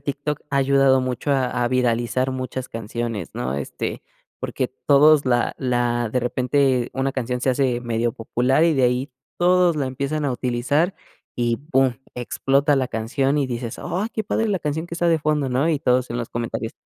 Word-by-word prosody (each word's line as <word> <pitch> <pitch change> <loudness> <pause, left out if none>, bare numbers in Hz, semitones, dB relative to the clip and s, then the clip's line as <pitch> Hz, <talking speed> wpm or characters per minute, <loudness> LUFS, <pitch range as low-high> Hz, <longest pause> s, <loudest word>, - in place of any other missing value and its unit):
TikTok 145 +1 -3
ha 140 - 0
ayudado 135 -1 +4
mucho 130 +2 -2
a 125 -2 +1
a 120 - +1
viralizar 125 0 +1
muchas 130 0 -4
canciones, 115 -3 -4
¿no? 65 +2 -2
Este, 70 0 -4 0.4
porque - - -2 0.2
todos 145 +1 +6
la 120 -1 +1
la 120 -2 0
de 125 - +1
repente 125 +1 +1
una 135 0 -1
canción 125 -1 -2
se 130 - +2
hace 125 -2 +1
medio 120 -1 -1
popular 125 +6 +1
y 165 -2 +3
de 135 - +1
ahí 125 +2 0 0.3
todos 180 -1 +4
la 140 -3 0
empiezan 140 +3 -2
a 140 - 0
utilizar 130 +9 0 0.4
y 120 -1 +1 0.2
boom 130 -2 +3 0.2
explota 135 +4 +1
la 130 -2 0
canción 135 +6 0
y 140 - +1
dices: 120 -2 -5
"Ay, 195 +5 -2
qué 220 - -2
padre 225 +2 0
la 200 -2 +1
canción 160 +1 -3
que 170 - -6
está 175 0 +1
de 165 -1 +3
fondo", 150 -2 0
¿no? 130 +6 +1
Y 155 - +1
todos 125 -2 +1
en 120 - -2
los 120 -1 -3
comentarios, 115 -1 -4
130 Hz, 190 wpm, -22 LUFS, 120-145 Hz, 0.4 s, todos